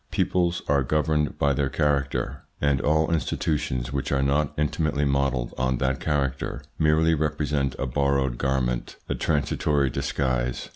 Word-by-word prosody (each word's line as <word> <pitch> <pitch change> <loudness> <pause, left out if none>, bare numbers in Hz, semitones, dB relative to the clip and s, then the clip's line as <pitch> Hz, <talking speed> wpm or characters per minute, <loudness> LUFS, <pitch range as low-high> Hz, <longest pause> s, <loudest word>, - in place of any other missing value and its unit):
Peoples 90 -1 0
are 70 -1 +3
governed 75 +2 0
by 70 0 +2
their 70 0 0
character, 70 -1 0 0.2
and 70 -2 +2
all 80 +3 +2
institutions 75 -6 -1
which 70 -1 -2
are 70 -1 +2
not 70 +1 +1
intimately 75 -1 0
modelled 70 -3 0
on 65 0 +1
that 65 0 0
character 70 -3 -2 0.2
merely 80 +1 +4
represent 75 -3 0
a - - -2
borrowed 70 -1 0
garment, 65 -3 -1
a - - -1
transitory 70 -2 +1
disguise. 65 -2 -1
70 Hz, 140 wpm, -25 LUFS, 65-75 Hz, 0.2 s, merely